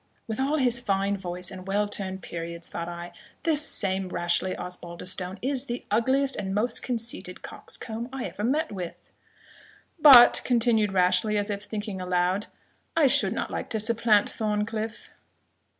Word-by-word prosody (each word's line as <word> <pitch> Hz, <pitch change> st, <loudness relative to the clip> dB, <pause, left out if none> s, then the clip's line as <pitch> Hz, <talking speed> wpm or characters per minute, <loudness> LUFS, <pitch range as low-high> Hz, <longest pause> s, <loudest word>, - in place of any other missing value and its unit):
"With 220 Hz, +1 st, -5 dB
all 280 Hz, +3 st, +1 dB
his 245 Hz, -4 st, +2 dB
fine 200 Hz, -3 st, 0 dB
voice, 180 Hz, -2 st, -5 dB
and 185 Hz, 0 st, -9 dB
well 205 Hz, +2 st, +1 dB
turned 190 Hz, -2 st, -3 dB
periods," 170 Hz, 0 st, -6 dB
thought 170 Hz, 0 st, -5 dB
I, 175 Hz, 0 st, -7 dB, 0.3 s
"this 310 Hz, -3 st, +1 dB
same 190 Hz, -8 st, -1 dB
Rashleigh 175 Hz, +1 st, 0 dB
Osbaldistone 180 Hz, +1 st, -3 dB
is 270 Hz, 0 st, -1 dB
the 240 Hz, -2 st, -5 dB
ugliest 265 Hz, +5 st, +2 dB
and 195 Hz, -1 st, -3 dB
most 225 Hz, +4 st, 0 dB
conceited 230 Hz, -6 st, -4 dB
coxcomb 230 Hz, +2 st, -6 dB
I 265 Hz, -2 st, -4 dB
ever 205 Hz, -, -6 dB
met 300 Hz, +8 st, 0 dB
with!" 180 Hz, -4 st, -8 dB, 0.9 s
"But," 270 Hz, -6 st, +9 dB
continued 225 Hz, -4 st, +2 dB
Rashleigh, 185 Hz, +3 st, +2 dB
as 205 Hz, +1 st, -1 dB
if 200 Hz, 0 st, -5 dB
thinking 205 Hz, -3 st, -5 dB
aloud, 180 Hz, +2 st, 0 dB, 0.5 s
"I 320 Hz, -, +5 dB
should 265 Hz, -, +4 dB
not -, -, -3 dB
like -, -, -4 dB
to 220 Hz, -, -1 dB
supplant 220 Hz, -1 st, +3 dB
Thorncliff." 215 Hz, +1 st, -3 dB
210 Hz, 150 wpm, -26 LUFS, 185-235 Hz, 0.9 s, But